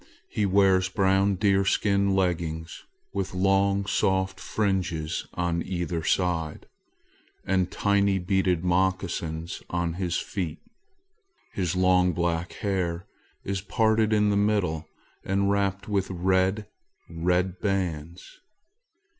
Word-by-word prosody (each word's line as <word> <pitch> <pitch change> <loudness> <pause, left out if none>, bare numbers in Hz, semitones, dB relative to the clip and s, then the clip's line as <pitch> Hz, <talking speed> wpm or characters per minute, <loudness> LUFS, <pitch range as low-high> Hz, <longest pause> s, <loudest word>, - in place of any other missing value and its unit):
He 105 -2 0
wears 95 -1 +3
brown 95 0 +2
deerskin 100 0 +2
leggins 85 -3 -2 0.3
with 95 -1 -3
long 95 +1 +2
soft 95 -1 0
fringes 90 -6 -2
on 85 -1 0
either 85 -3 -3
side, 85 -4 -1 0.8
and 95 -1 +1
tiny 100 -1 +2
beaded 90 -2 +1
moccasins 90 -2 -1
on 85 -1 -1
his 90 -1 -2
feet. 85 -6 -4 1.0
His 90 -2 -1
long 90 -1 +3
black 85 0 -1
hair 90 -3 -1 0.4
is 100 -1 -2
parted 110 +1 +2
in 105 -1 +3
the - - +1
middle 100 -7 0 0.4
and 100 +1 +1
wrapped 100 0 0
with 100 -3 0
red, 95 +3 +1 0.4
red 90 +2 0
bands. 90 - -3
95 Hz, 105 wpm, -26 LUFS, 85-100 Hz, 1.0 s, wears